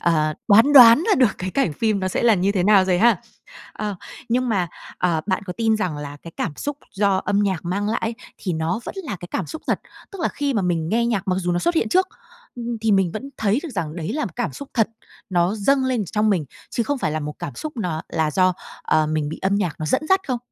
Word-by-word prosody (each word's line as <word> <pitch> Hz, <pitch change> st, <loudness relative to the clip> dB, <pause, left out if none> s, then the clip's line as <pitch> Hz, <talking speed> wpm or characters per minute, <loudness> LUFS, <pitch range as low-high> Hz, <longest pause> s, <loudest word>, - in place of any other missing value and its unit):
ờ, 155 Hz, -3 st, +1 dB
đoán 225 Hz, +8 st, +6 dB
đoán 250 Hz, +4 st, +9 dB
ra -, -, +5 dB
được 250 Hz, -6 st, +3 dB
cái 185 Hz, +1 st, -3 dB
cảnh 190 Hz, -, +1 dB
phim 215 Hz, +4 st, 0 dB
nó 185 Hz, -, -1 dB
sẽ -, -, -2 dB
là 230 Hz, -3 st, +5 dB
như 190 Hz, +2 st, +1 dB
thế 190 Hz, -3 st, +1 dB
nào 195 Hz, -1 st, +5 dB
rồi 180 Hz, -1 st, +2 dB
ha? 235 Hz, -2 st, +5 dB, 0.6 s
Ờ, 210 Hz, -2 st, -4 dB, 0.3 s
nhưng 250 Hz, +1 st, +1 dB
mà, 185 Hz, -6 st, 0 dB, 0.3 s
ờ, 170 Hz, -3 st, +1 dB
bạn 190 Hz, 0 st, 0 dB
có 180 Hz, -, -3 dB
tin 225 Hz, -1 st, +2 dB
rằng 180 Hz, -8 st, -2 dB
là 145 Hz, 0 st, -7 dB
cái 165 Hz, -, -9 dB
cảm 165 Hz, -, -2 dB
xúc 290 Hz, -1 st, -4 dB, 0.2 s
do 200 Hz, -1 st, +2 dB
âm 200 Hz, +1 st, +1 dB
nhạc 190 Hz, -5 st, -1 dB
mang 200 Hz, +4 st, -1 dB
lại 220 Hz, -, 0 dB
ấy, 225 Hz, +1 st, -1 dB, 0.2 s
thì 185 Hz, -, -3 dB
nó 160 Hz, +6 st, -1 dB
vẫn -, -, -6 dB
là 205 Hz, -10 st, -4 dB
cái 175 Hz, -, -8 dB
cảm 185 Hz, -, -2 dB
xúc 315 Hz, -, -8 dB
thật? -, -, 0 dB, 0.3 s
Tức 390 Hz, -, -8 dB
là -, -, +2 dB
khi 285 Hz, -2 st, -2 dB
mà 205 Hz, -, +1 dB
mình 165 Hz, -3 st, 0 dB
nghe 235 Hz, +4 st, +1 dB
nhạc 200 Hz, -4 st, -1 dB
mặc 185 Hz, -, +2 dB
dù 180 Hz, -1 st, -1 dB
nó 175 Hz, -, +1 dB
xuất 345 Hz, -, +1 dB
hiện 230 Hz, -, +1 dB
trước, 370 Hz, +8 st, +3 dB, 0.7 s
thì 220 Hz, -2 st, +2 dB
mình 190 Hz, -3 st, +3 dB
vẫn 270 Hz, +6 st, -6 dB
thấy 215 Hz, +3 st, +1 dB
được 335 Hz, -, -5 dB
rằng 165 Hz, -4 st, -3 dB
đấy 170 Hz, +6 st, -3 dB
là 300 Hz, +1 st, -1 dB
một -, -, -5 dB
cảm 245 Hz, -, -2 dB
xúc 280 Hz, -1 st, -9 dB
thật, 225 Hz, -4 st, +3 dB, 0.4 s
nó 175 Hz, +3 st, +2 dB
dâng 265 Hz, +6 st, +2 dB
lên 250 Hz, -5 st, 0 dB
trong 210 Hz, +4 st, +1 dB
mình, 175 Hz, -7 st, +1 dB, 0.3 s
chứ 235 Hz, -, 0 dB
không 285 Hz, +3 st, -2 dB
phải 155 Hz, -, -1 dB
là 155 Hz, -, -2 dB
một 150 Hz, 0 st, -5 dB
cảm 160 Hz, -8 st, -6 dB
xúc 310 Hz, -1 st, -6 dB
no 175 Hz, -8 st, -2 dB
là 160 Hz, -2 st, 0 dB
do, 185 Hz, +4 st, +3 dB, 0.3 s
ờ, 155 Hz, -1 st, +2 dB
mình 155 Hz, -1 st, -1 dB
bị 160 Hz, -, -6 dB
âm 195 Hz, +1 st, +2 dB
nhạc, 185 Hz, -7 st, -1 dB
nó 155 Hz, -, -3 dB
dẫn 155 Hz, -, +1 dB
dắt 380 Hz, 0 st, +4 dB
không? 255 Hz, -4 st, -1 dB
200 Hz, 265 wpm, -22 LUFS, 175-235 Hz, 0.7 s, đoán